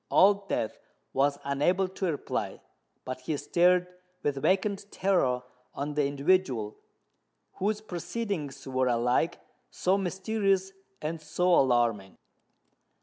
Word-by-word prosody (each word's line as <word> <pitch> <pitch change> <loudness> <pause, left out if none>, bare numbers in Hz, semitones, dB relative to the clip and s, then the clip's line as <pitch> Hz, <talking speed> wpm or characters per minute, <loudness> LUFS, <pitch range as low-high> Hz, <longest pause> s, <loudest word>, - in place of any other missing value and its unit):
Old 200 0 +4
Death 110 - -2 0.3
was 140 +1 +2
unable 150 +8 +1
to 190 0 -3
reply: 145 - -3 0.5
but 130 0 -4
he 145 +3 -2
stared 180 +3 +3 0.4
with 140 -2 -1
vacant 195 +3 +1
terror 135 -11 +1 0.3
on 145 +2 -3
the 145 -1 +2
individual 140 - +1 0.8
whose 210 +2 0
proceedings 180 - -4
were 130 -1 +1
alike 125 +6 +1 0.3
so 190 +2 +1
mysterious 195 0 0 0.3
and 160 +1 -3
so 175 +4 +1
alarming. 120 - +2
165 Hz, 110 wpm, -29 LUFS, 135-190 Hz, 0.8 s, Old